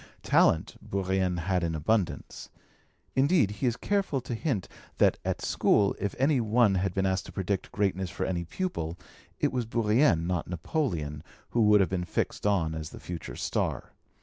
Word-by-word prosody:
Talent 80 - +3
Bourrienne 95 -2 -1
had 90 +1 0
in 80 -1 -1
abundance; 85 -1 -1 0.7
indeed 140 - +3
he 125 +5 -2
is 120 0 0
careful 195 -9 0
to 120 - -5
hint 115 - -1 0.3
that - - +3
at - - -2
school 100 -2 +3
if 100 - -2
any 135 0 +3
one 110 -1 +3
had 95 0 0
been 95 0 +1
asked 95 0 0
to - - -9
predict 95 0 -2
greatness 95 -2 0
for 85 - -3
any 85 -2 -1
pupil, 85 - -3 0.4
it - - +1
was 125 -3 -2
Bourrienne, 115 - +3
not 90 -2 -1
Napoleon, 85 - -2 0.3
who 120 - +2
would 105 -1 +6
have 95 - +2
been 90 -2 -1
fixed 95 - -2
on 85 -6 +1
as 80 -1 -5
the - - -11
future 85 -2 -7
star. - - -2
95 Hz, 175 wpm, -28 LUFS, 85-115 Hz, 0.7 s, would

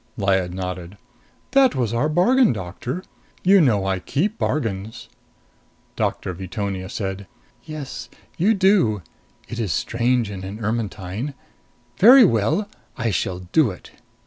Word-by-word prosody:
Lyad 95 -2 +1
nodded. 90 0 -6 0.5
"That 270 -1 +4
was 120 -4 -1
our 125 +6 +1
bargain, 225 - +4
Doctor. 115 - -5 0.4
You 195 +1 +6
know 105 -10 +3
I 95 -1 0
keep 195 - -2
bargains." 110 -7 -3 0.9
Doctor 90 - -2
Veetonia 95 +1 -4
said, 95 -1 -4 0.4
"Yes. 140 -6 -7 0.3
You 210 +6 +3
do. 185 - +3 0.4
It 120 - -6
is 105 -6 -1
strange 120 +1 0
in 95 -2 -7
an 100 +2 -6
Ermetyne. 110 +2 -3 0.6
Very 245 +4 +9
well! 115 - +1 0.3
I 115 -2 0
shall 90 +1 -2
do 155 -7 +4
it." 90 - -10
115 Hz, 125 wpm, -22 LUFS, 95-155 Hz, 0.9 s, Very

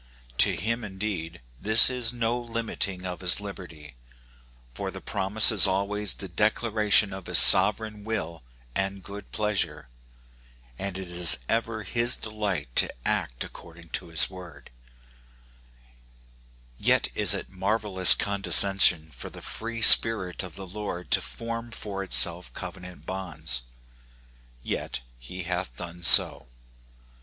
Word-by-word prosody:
To - - +4
him, 115 +4 -4
indeed, 95 -5 -7 0.2
this 110 +2 +5
is 125 -3 -4
no 120 0 -3
limiting 115 -5 -5
of 90 0 -8
his 90 0 +1
liberty; 90 -8 -12 0.8
for 95 +10 -7
the 95 0 -10
promise 100 +3 +2
is 105 -2 +7
always 100 +2 -1
the 95 - -8
declaration 105 +2 0
of 95 -1 -11
his - - +2
sovereign 110 -2 +6
will 85 -8 -6 0.3
and 95 +2 -4
good 100 +1 -12
pleasure, 105 - -4 0.9
and 100 -1 -6
it 95 -1 -9
is 85 -5 +4
ever 115 -1 -3
his 120 +5 +1
delight 100 - -6
to - - 0 0.2
act - - -4
according 85 0 -15
to - - -6
his 80 -2 +2
word; 90 -1 -14 2.1
yet - - 0
is - - +2
it - - -9
marvelous 95 -1 +5
condescension 95 -5 +4
for 60 - -10
the - - -14
free 115 0 -7
spirit 105 -6 +5
of 90 -4 -9
the 95 - -10
Lord 95 -2 -9
to - - +2
form 115 0 -8
for 105 -4 -8
itself 60 -9 +3
covenant 90 -1 -11
bonds. 80 -9 -6 1.0
Yet - - -6 0.2
he 90 +10 -10
hath 85 -8 -6
done 85 +4 -10
so. 85 - +2
95 Hz, 130 wpm, -24 LUFS, 90-110 Hz, 2.1 s, is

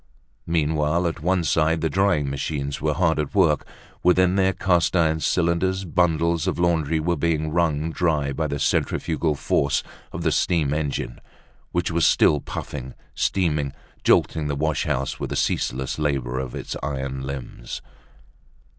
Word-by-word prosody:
Meanwhile, 80 +1 +1
at 85 -1 -2
one 90 +1 +1
side 80 0 +2
the 80 - +2
drying 90 -5 +2
machines 70 0 -3
were 75 0 0
hard 80 -3 +2
at 75 +4 -3
work; 85 -7 +3 0.3
within 90 +1 +4
their 95 -1 +3
cast 90 -2 +1
iron 80 -2 +3
cylinders 90 +3 +1
bundles 85 -1 +1
of - - 0
laundry 80 -3 +1
were 85 +2 0
being 80 0 0
wrung 80 -2 +1
dry 75 -5 0
by 80 +2 -1
the 70 - -3
centrifugal 75 +3 0
force 70 0 +1 0.3
of - - -5
the - - +2
steam 75 -5 +1
engine, 75 -2 -3 0.5
which 85 0 0
was 85 0 +1
still 75 - +4
puffing, 65 -2 -6 0.2
steaming, 75 -7 0 0.3
jolting 75 -2 +3
the 70 - -1
wash 80 +2 0
house 70 +1 -2
with - - -3
the - - -3
ceaseless 65 +3 -1
labor 65 -4 -1
of 65 -2 -5
its - - -5
iron 65 -2 -3
limbs. 70 -1 -6
80 Hz, 155 wpm, -23 LUFS, 70-85 Hz, 0.5 s, within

